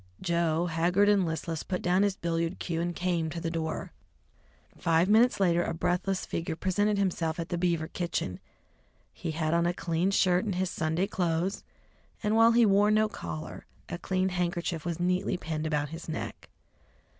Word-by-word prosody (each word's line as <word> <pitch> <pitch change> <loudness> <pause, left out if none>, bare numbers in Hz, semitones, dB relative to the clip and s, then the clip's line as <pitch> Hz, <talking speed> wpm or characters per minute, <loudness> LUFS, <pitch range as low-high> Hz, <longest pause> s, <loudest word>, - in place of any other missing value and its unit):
Joe, 170 -2 +1
haggard 175 +4 +2
and 200 -4 +3
listless, 160 0 -3
put 180 -2 -4
down 180 +2 +3
his 200 -1 +2
billiard 170 0 -2
cue 165 -2 -2
and 175 0 -2
came 175 -3 0
to 165 +2 -5
the 165 0 -3
door. 160 -1 -3 0.8
Five 165 +2 +2
minutes 225 +4 +4
later 175 -3 +3
a 165 - -2
breathless 180 +3 0
figure 165 -1 -3
presented 205 +4 +1
himself 170 -4 0
at 165 - -4
the 175 - -1
Beaver 170 -3 0
kitchen. 170 - -3 0.7
He 170 - -5
had 155 0 -1
on 170 0 +3
a 175 - -1
clean 170 +1 0
shirt 185 -2 +3
and 205 -4 -2
his 185 0 -1
Sunday 160 +4 0
clothes, 180 -1 -1 0.6
and 210 +1 +2
while 225 +1 +6
he 235 0 +6
wore 205 0 +4
no 215 0 +4
collar, 80 - -7 0.2
a 175 - -4
clean 185 +1 0
handkerchief 175 -2 -2
was 170 -1 -3
neatly 180 +1 0
pinned 160 -2 -3
about 150 -2 -1
his 165 +2 -8
neck. 160 - -5
175 Hz, 180 wpm, -29 LUFS, 165-190 Hz, 0.8 s, while